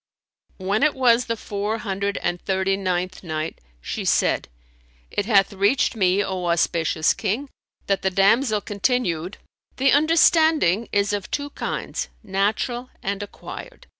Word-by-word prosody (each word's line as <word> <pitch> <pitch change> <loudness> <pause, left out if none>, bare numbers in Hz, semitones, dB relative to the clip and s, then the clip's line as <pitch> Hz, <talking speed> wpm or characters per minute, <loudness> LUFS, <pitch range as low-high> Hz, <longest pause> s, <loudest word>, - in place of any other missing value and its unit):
When 200 +3 -1
it 305 -1 +3
was 245 -2 +4
the 230 -1 -1
Four 210 +1 -3
Hundred 200 -1 -2
and 175 0 -1
Thirty 190 0 0
ninth 185 -1 -2
Night, 155 -1 -4 0.2
She - - -4
said, - - +1 0.6
It 205 - -2
hath 200 -3 +4
reached 205 +7 +2
me, 195 -1 +2
O 185 -2 -3
auspicious 165 -2 +2
King, 230 +7 -2 0.4
that 195 -1 0
the 190 - +1
damsel 210 +4 +3
continued, 200 -5 -1 0.4
"The 270 +1 +3
understanding 310 - +4
is 200 0 +1
of 200 -2 -3
two 285 0 -3
kinds, - - -4
natural 220 +5 -1
and 200 +1 -2
acquired. 355 - -9
200 Hz, 135 wpm, -23 LUFS, 190-240 Hz, 0.6 s, was